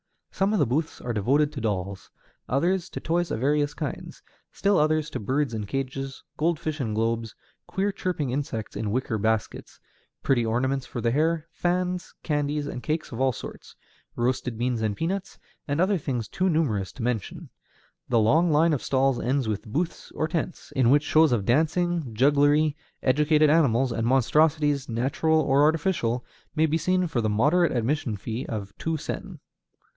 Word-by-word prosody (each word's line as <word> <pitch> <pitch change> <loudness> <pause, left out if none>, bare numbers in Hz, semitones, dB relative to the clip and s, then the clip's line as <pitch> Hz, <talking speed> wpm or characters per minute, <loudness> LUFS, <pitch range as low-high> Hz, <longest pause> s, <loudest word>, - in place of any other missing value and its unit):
Some 195 +2 +1
of - - +2
the - - +4
booths 150 +7 -2
are 120 - -4
devoted 140 +8 +2
to 140 - -6
dolls; 100 -3 -3 0.4
others 175 +7 +1
to - - -6
toys 175 +1 0
of - - -2
various 145 +2 +1
kinds; 150 -2 -6 0.3
still 200 -3 +2
others 155 0 +1
to - - -3
birds 130 +4 -1
in 105 -2 -4
cages, 135 +1 -4
goldfish 155 -1 -1
in 110 -4 -2
globes, 115 0 -1 0.3
queer 200 +2 0
chirping 170 -9 -2
insects 125 -6 -3
in 105 - -2
wicker 115 -1 -1
baskets, 110 +1 -2 0.4
pretty 125 -3 +2
ornaments 130 +4 0
for - - -5
the 115 - +1
hair, 160 +3 +1
fans, 180 +1 -2
candies, 145 -1 -1
and 135 -3 -5
cakes 155 +3 -2
of 120 +1 -4
all 135 0 +3
sorts, - - -9 0.4
roasted 125 -1 -1
beans 120 -1 -1
and 105 -2 -1
peanuts, 185 +4 -3 0.3
and 145 +1 -1
other 190 +1 +2
things 125 -6 -3
too 185 +1 0
numerous 125 - 0
to 130 - -7
mention. 115 -5 -3 0.6
The 120 - +3
long 155 +11 +4
line 160 +2 +4
of 140 - -1
stalls 135 -1 +1
ends 130 -1 0
with 105 0 -3
booths, 165 +10 -3
or 155 - 0
tents, 170 +1 -4
in 130 -3 +4
which 145 +3 +5
shows 155 0 +4
of 110 -5 +1
dancing, 160 - +1
jugglery, 145 +4 +4 0.3
educated 150 +3 +4
animals, 135 -5 +3
and 115 0 -1
monstrosities, 145 +2 +2
natural 135 +7 +1
or 140 -1 +3
artificial, 150 -6 +1 0.3
may 160 0 +4
be 160 +1 0
seen 185 +3 +1
for 155 -8 -1
the 110 - 0
moderate 145 +11 +3
admission 120 -2 -1
fee 115 +6 -5
of 100 -3 -5
two 160 -1 -1
sen. - - -6
140 Hz, 170 wpm, -26 LUFS, 120-160 Hz, 0.6 s, which